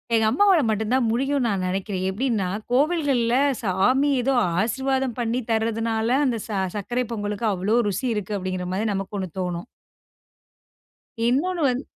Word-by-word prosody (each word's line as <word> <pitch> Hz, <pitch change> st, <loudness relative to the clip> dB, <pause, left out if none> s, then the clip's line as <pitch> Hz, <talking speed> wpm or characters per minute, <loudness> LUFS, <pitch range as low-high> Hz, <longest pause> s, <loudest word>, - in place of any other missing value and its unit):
எங்க 220 Hz, -1 st, +3 dB
அம்மாவால 370 Hz, -, +4 dB
மட்டும் 220 Hz, +1 st, -1 dB
தான் 255 Hz, -3 st, +2 dB
முடியும்னு 270 Hz, +1 st, +1 dB
நான் 195 Hz, -4 st, -1 dB
நினைக்கிறேன். 190 Hz, 0 st, -2 dB
எப்டின்னா 215 Hz, -2 st, -1 dB, 0.2 s
கோவில்கள்ல 275 Hz, -4 st, +2 dB, 0.3 s
சாமி 240 Hz, +9 st, +2 dB
ஏதோ 270 Hz, +2 st, +1 dB, 0.3 s
ஆசீர்வாதம் 265 Hz, +2 st, -1 dB
பண்ணி 235 Hz, +1 st, 0 dB
தர்றதுனால 225 Hz, 0 st, 0 dB, 0.2 s
அந்த 240 Hz, -3 st, 0 dB
ச -, -, -24 dB, 0.3 s
சர்க்கரை 240 Hz, +5 st, -1 dB
பொங்கலுக்கு 210 Hz, +1 st, -3 dB
அவ்வளோ 200 Hz, +6 st, +1 dB
ருசி 210 Hz, +7 st, -2 dB
இருக்கு. 210 Hz, 0 st, -3 dB
அப்டிங்குற 185 Hz, -1 st, -3 dB
மாரி 210 Hz, +4 st, -1 dB
நமக்கு 195 Hz, +1 st, -4 dB
1 185 Hz, -2 st, -4 dB
தோணும். 180 Hz, +3 st, -3 dB, 1.6 s
இன்னொன்னு 335 Hz, +8 st, +1 dB
வந்து. 250 Hz, +2 st, -1 dB
225 Hz, 140 wpm, -24 LUFS, 200-260 Hz, 1.6 s, அம்மாவால